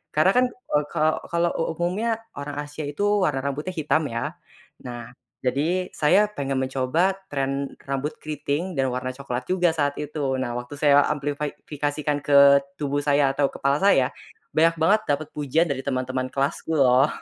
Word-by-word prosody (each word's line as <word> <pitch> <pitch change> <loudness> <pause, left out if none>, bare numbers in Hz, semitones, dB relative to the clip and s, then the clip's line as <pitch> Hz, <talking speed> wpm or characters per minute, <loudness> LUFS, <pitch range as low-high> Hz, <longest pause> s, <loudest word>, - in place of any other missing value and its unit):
karena 155 +5 +5
kan, - - +4
eee, 150 -12 -2
ka 155 +1 +1
kalo 170 0 +2
u 165 - -1
umumnya 210 +7 0 0.2
orang 145 0 -6
Asia 145 +1 -8
itu 145 +8 -3 0.2
warna 135 -3 0
rambutnya 150 +6 -3
hitam 155 0 +1
ya. 115 0 -3 0.5
Nah, 120 -1 -7 0.3
jadi 160 +9 0
saya 155 +7 +4 0.2
pengen 135 -1 -1
mencoba 135 +8 +1 0.2
tren 135 0 -2 0.2
rambut 140 +2 -2
keriting 155 +3 -3
dan 135 -2 +1
warna 125 0 -3
coklat 130 -2 -5
juga 180 -2 +2
saat 145 -2 0
itu. 150 +1 -5 0.2
Nah, 120 -2 -2
waktu 125 +3 -6
saya 145 -1 +5
amplify 145 0 -2
fikasikan 145 0 -2
ke 140 0 +7 0.2
tubuh 145 0 -1
saya 140 -1 +3
atau 140 0 +1
kepala 140 +2 0
saya, 165 -10 +4 0.4
banyak 165 +1 +4
banget 210 +6 +4
dapat 145 +1 0
pujian 150 +3 +2
dari 135 - -2
teman-teman 130 -1 -1
kelasku 140 +3 -1
loh. 135 0 +5
145 Hz, 165 wpm, -24 LUFS, 135-155 Hz, 0.5 s, ke